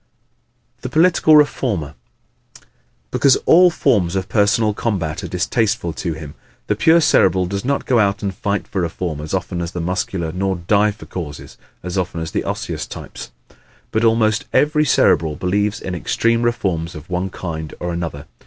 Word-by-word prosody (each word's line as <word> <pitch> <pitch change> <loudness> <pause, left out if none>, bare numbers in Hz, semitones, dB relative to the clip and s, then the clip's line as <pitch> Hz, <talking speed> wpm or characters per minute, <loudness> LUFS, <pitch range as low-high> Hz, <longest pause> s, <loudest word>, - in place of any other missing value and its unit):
The 130 - -5
Political 160 0 +4
Reformer 110 - +1 0.7
¶ - - -32 0.5
Because 140 - +4
all 180 +2 +7
forms 100 - +1
of 95 -1 -2
personal 105 +1 +2
combat 95 -9 -2
are - - -4
distasteful 105 -1 -1
to 80 +2 -3
him 75 -2 -9 0.3
the 105 - 0
pure 160 +10 +5
Cerebral 95 - +3
does 100 +2 -4
not 140 +2 -1
go 125 -3 +3
out 100 0 +1
and 100 -1 -2
fight 100 +1 -2
for 95 - -2
reform 85 -2 -3
as 75 - -7
often 90 -1 -3
as 85 +1 -5
the 90 - -4
Muscular 85 -1 -2
nor 95 +2 -1
die 100 +4 +2
for 105 +1 -9
causes 75 -6 -7 0.3
as 90 +2 -2
often 90 -2 -3
as 80 0 -5
the - - -1
Osseous - - -4
types. - - -9 0.6
But 110 - 0
almost 110 -2 +2
every 150 +1 +3
Cerebral 80 - +3
believes 100 +5 -1
in 95 - -5
extreme 115 +7 0
reforms 95 -9 -1
of 75 0 -10
one 90 +1 -2
kind 80 -4 -6
or 90 0 -3
another. 80 -4 -5
95 Hz, 170 wpm, -19 LUFS, 85-115 Hz, 0.7 s, all